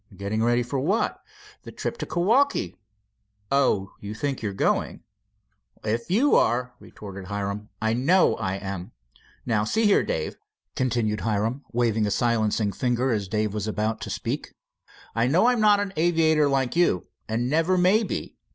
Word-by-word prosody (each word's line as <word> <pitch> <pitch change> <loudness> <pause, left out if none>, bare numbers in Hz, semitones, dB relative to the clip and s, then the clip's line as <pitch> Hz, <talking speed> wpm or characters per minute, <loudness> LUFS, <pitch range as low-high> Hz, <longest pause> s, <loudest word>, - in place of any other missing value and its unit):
"Getting 105 +3 -2
ready 120 +1 +2
for 130 +3 -3
what?" 190 - 0 0.4
"The - - -10
trip - - -4
to - - -4
Kewaukee." 205 - +1 0.8
"Oh, 105 -8 +2
you 105 +1 -7
think 140 +3 -3
you're 105 -3 -2
going?" 95 - -1 0.8
"If 115 +5 -2
you 240 +11 +3
are," 125 +1 +2
retorted 100 -2 -10
Hiram, 100 +2 -4
"I 110 0 +1
know 155 +10 +3
I 95 0 -2
am. 95 -2 -6 0.5
Now, 110 -3 +1
see 220 - +1
here, 205 - +5
Dave," 80 - -3 0.4
continued 115 -4 0
Hiram, 110 +5 -1
waving 115 -3 +1
a - - 0
silencing 110 -2 +1
finger 125 +5 0
as 105 -4 -1
Dave 105 +1 -1
was 105 0 -3
about 110 +1 -2
to - - -5
speak, - - -4 0.6
"I 115 +2 +1
know 170 - +3
I'm 245 -2 +3
not 210 -1 +5
an 200 -1 -3
aviator 160 -3 +3
like 135 -1 0
you, 170 - +2 0.2
and 115 +2 0
never 165 +6 +2
will 190 +5 +4
be. - - -5
120 Hz, 160 wpm, -25 LUFS, 105-160 Hz, 0.8 s, here